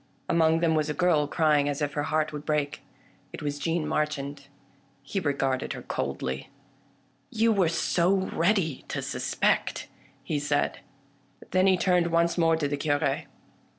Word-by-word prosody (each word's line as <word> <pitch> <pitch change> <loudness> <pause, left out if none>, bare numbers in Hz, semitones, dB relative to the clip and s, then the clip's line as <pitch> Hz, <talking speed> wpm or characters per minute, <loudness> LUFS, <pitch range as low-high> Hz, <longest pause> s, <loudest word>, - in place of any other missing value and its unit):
Among 165 -1 +3
them 165 -2 +3
was 155 -1 +1
a 150 - -2
girl 170 -5 +2
crying 150 -3 +2
as 145 - -2
if 145 -2 -1
her 145 - -1
heart 155 0 0
would 150 -1 -5
break. 150 -1 -1 0.5
It - - -8
was 145 -1 -3
Jeanne 165 +1 -1
Marchand. 145 -2 -2 0.6
He 195 +8 -2
regarded 135 -5 -1
her - - -8
coldly. 65 0 -3 0.4
" 135 0 -38
You 230 0 +5
were 190 -6 +3
so 170 +2 +1 0.2
ready 170 -5 +1
to - - -3
suspect," - - -1 0.3
he 150 - -1
said. 145 0 0 0.7
Then 185 +1 +3
he 190 -1 +4
turned 180 -1 +2
once 170 0 +2
more 165 -2 +3
to 155 -3 -1
the 145 0 -2
Cure. 145 0 0
155 Hz, 160 wpm, -27 LUFS, 145-170 Hz, 0.7 s, You